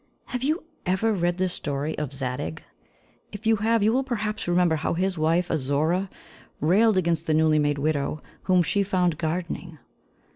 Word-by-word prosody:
Have 250 -2 -4
you 310 +7 0 0.2
ever 190 +5 +1
read 175 -2 0
the 185 0 +1
story 150 -3 -3
of 150 -3 -3
Zadig? 125 - -4 0.7
If 205 +1 -9
you 225 0 +4
have, 225 +1 +2
you 220 +2 +3
will 265 +2 +2
perhaps 215 -6 -3
remember 175 -2 +3
how 155 - -1
his 185 +2 0
wife, 165 +2 +1
Azora, 160 +6 0 0.5
railed 200 +7 +4
against 165 -2 0
the 155 - +2
newly 155 -1 +4
made 145 -1 +1
widow 150 0 -1 0.2
whom 185 -2 +4
she 200 +4 +1
found 180 -5 +1
gardening. 170 0 -3
175 Hz, 170 wpm, -25 LUFS, 155-200 Hz, 0.7 s, you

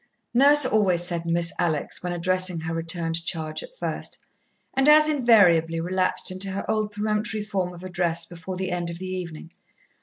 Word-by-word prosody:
Nurse 285 +3 +6
always 190 -7 +2
said 170 -1 -3
"Miss 170 0 +1
Alex" 160 -4 -1
when 180 - -4
addressing 185 0 0
her 165 +1 -4
returned 165 0 -2
charge 155 -2 -3
at - - -13
first, - - -5 0.6
and 270 +2 +3
as 305 0 +7
invariably 200 - +3
relapsed 185 +2 0
into 185 +1 -2
her 195 +1 -4
old 215 -1 -1
peremptory 210 +1 -2
form 195 -4 -3
of 175 0 -12
address 175 -2 -1
before 180 +2 -8
the 185 0 -4
end 175 -1 -2
of 170 - -6
the 185 - -7
evening. 175 -3 -7
180 Hz, 175 wpm, -24 LUFS, 170-210 Hz, 0.6 s, as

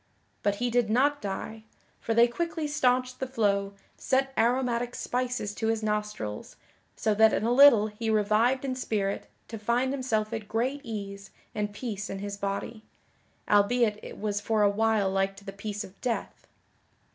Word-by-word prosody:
But 205 -1 +1
he 245 +3 -1
did 240 -2 +2
not 280 +6 +2
die, 215 +2 -5 0.4
for 225 - -2
they 235 +1 +7
quickly 320 +4 -3
staunched 255 -3 +1
the 265 - -2
flow, 200 -5 0 0.2
set 270 +1 0
aromatic 245 +1 +1
spices 250 -4 -2
to 220 +1 -2
his 225 -1 0
nostrils, 210 - -3 0.4
so 215 - +1
that 220 +1 +5
in - - 0
a 230 - +1
little 245 -5 +7
he 220 +1 -4
revived 220 +5 +2
in 260 - -1
spirit 210 -6 -2 0.2
to 225 - -7
find 245 +5 +1
himself 230 -5 -1
at 220 -2 -4
great 250 +6 -1
ease 200 -3 -6 0.2
and 210 -1 -2
peace 210 -1 -5
in 195 - -4
his 200 +1 -5
body 200 +3 -4 0.6
(albeit 210 +1 +3
it - - -9
was 205 -1 -2
for 215 0 +1
a 205 - +5
while 215 -2 +2
like 195 0 0
to 200 0 -15
the 195 - -6
peace 205 +1 -5
of 190 0 -14
death). 245 -3 -3
220 Hz, 170 wpm, -28 LUFS, 205-245 Hz, 0.6 s, they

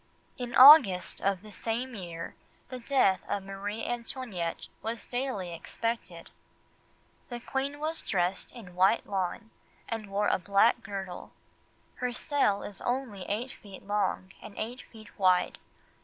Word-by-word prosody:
In 245 -1 -4
August 255 - +8
of 195 -1 0
the 215 - -11
same 235 +5 -3
year, 170 -5 -6 0.4
the 255 - -6
death 230 -7 +3
of 200 - -1
Marie 200 +3 -5
Antoinette 235 -8 -4
was 225 +1 -4
daily 245 -9 -3
expected. 180 -1 -4 1.0
"The 240 -1 -5
queen 275 +4 -3
was 315 +2 -2
dressed 180 0 -1
in 205 -8 -11
white 190 +5 +3
lawn 195 +4 -3 0.4
and 225 -3 -4
wore 205 +1 +1
a - - +2
black 200 +6 +3
girdle... 195 -3 -6 0.6
her 250 -1 -2
cell 245 -7 +1
is 205 - -7
only 245 -7 -3
eight 235 +6 -2
feet 195 -2 -13
long, 195 -2 -1
and 200 - -11
eight 240 +4 -4
feet 215 -2 -14
wide. 185 -2 +3
210 Hz, 140 wpm, -29 LUFS, 190-245 Hz, 1.0 s, August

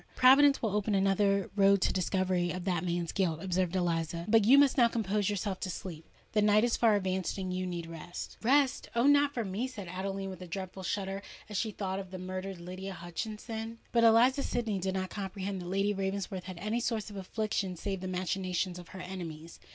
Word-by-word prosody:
"Providence 275 +2 +6
will 210 -3 0
open 210 0 +1
another 195 0 +2
road 200 -1 +5
to - - +3
the - - -2
discovery 185 -1 0
of 180 0 -4
that 180 -3 0
man's 175 -1 -1
guilt," 170 -5 0
observed 185 0 -1
Eliza. 170 -1 -1
"But 220 -1 +5
you 260 +5 +7
must 285 -2 +5
now 240 -3 +6
compose 210 -3 0
yourself 200 -1 -2
to 190 - -3
sleep: 165 -3 -7 0.2
the 215 - +2
night 210 +1 +5
is 240 -1 +2
far 225 -3 +4
advanced—and 190 -1 -1
you 185 0 -2
need 175 -2 -4
rest." 165 +1 -7
"Rest!—oh! 255 -1 +2
not 285 0 +5
for 235 -5 -2
me!" 200 +7 -2
said 210 -8 -8
Adeline, 195 +2 -4
with 185 -1 -10
a 180 - -7
dreadful 190 +2 -6
shudder, 195 +1 -2 0.3
as 210 - -7
she 220 - 0
thought 195 -2 -3
of 190 -2 -7
the 185 - -7
murdered 185 0 -5
Lydia 185 +2 -6
Hutchinson. 220 +6 -5
But 235 -1 +3
Eliza 240 +5 +6
Sydney 225 -7 -1
did 190 +1 -2
not 185 -1 -2
comprehend 195 -1 -4
that 175 - -7
Lady 195 +3 +1
Ravensworth 190 -1 -3
had 185 -2 -7
any 215 +6 -1
source 220 -3 -2
of - - -10
affliction 195 -1 -2
save 195 +2 -4
the 185 - -4
machinations 185 0 -2
of 175 - -11
her 190 - -9
enemies. 170 -3 -7
195 Hz, 205 wpm, -31 LUFS, 185-215 Hz, 0.3 s, you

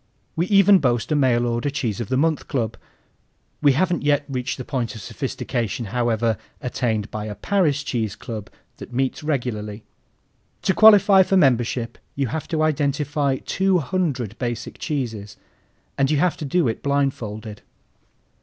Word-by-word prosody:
We 170 +3 0
even 200 -1 +6
boast 120 -1 0
a - - +3
mail 125 -4 +3
order 120 +3 -1
Cheese 120 -7 -2
of 115 - -5
the 130 - +1
Month 160 +2 +1
Club. 115 -5 -2 0.9
We 145 -3 +5
haven't 175 +4 +1
yet 145 0 +2
reached 130 -1 -3
the 130 - -6
point 125 -4 -3
of 110 - -8
sophistication, 120 +4 -3
however, 115 -3 +1 0.2
attained 115 -5 -2
by 105 0 -4
a 105 -1 -5
Paris 155 - +1
cheese 110 -8 -2
club 110 -4 -7 0.3
that - - -10
meets 130 +1 -1
regularly. 120 -8 -3 0.8
To 190 - +2
qualify 205 -2 +7
for 190 +1 +3
membership 120 -5 +1 0.2
you 140 -4 -1
have 160 +4 -4
to 155 -2 0
identify 145 -2 0
two 190 0 +2
hundred 140 - -2
basic 120 -1 -4
cheeses, 115 -9 -4 0.6
and 135 -1 +3
you 155 - +2
have 175 +3 +2
to 155 - -5
do 165 +2 +1
it 110 - -2
blindfolded. 115 -7 -2
130 Hz, 155 wpm, -22 LUFS, 115-155 Hz, 0.9 s, qualify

